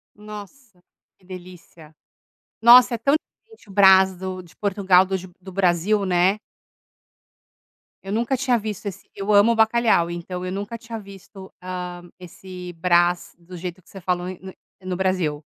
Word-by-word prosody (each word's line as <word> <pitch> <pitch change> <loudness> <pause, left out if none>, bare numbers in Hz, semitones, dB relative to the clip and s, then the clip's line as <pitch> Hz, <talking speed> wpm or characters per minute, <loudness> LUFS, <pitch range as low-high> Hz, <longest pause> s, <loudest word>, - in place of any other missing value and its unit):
Nossa, 210 +1 -12 0.4
que 185 - -27
delícia. 175 -4 -13 0.7
Nossa 245 +1 +8
é 230 - -3
tão 275 +5 +2
diferente 445 - -24
o - - -12
Brás 190 -1 +6
do 185 0 -6
de 170 - -19
Portugal 190 -2 +3
dos 190 -1 -3 0.2
do 190 0 -11
Brasil, 195 +2 +1
né. 185 +2 +2 1.7
Eu 195 - -7
nunca 235 +4 0
tinha 255 -2 +1
visto 210 -1 -6
esse, 200 - -7
eu 200 +2 -2
amo 215 +3 +5
bacalhau. 220 -6 +3
Então 180 +1 -6
eu 185 - -4
nunca 205 +4 -5
tinha, 230 -1 -8
ah, 220 - -8
visto 195 -1 -13 0.7
esse 180 0 -10
Brás 175 +1 +1
do 175 +1 -11
jeito 180 +1 -7
que - - -25
você 195 - -10
falou 180 0 -2
em 185 - -8
no 190 0 -10 0.3
no 185 -1 -4
Brasil. 175 -6 -1
190 Hz, 160 wpm, -22 LUFS, 180-210 Hz, 1.7 s, Nossa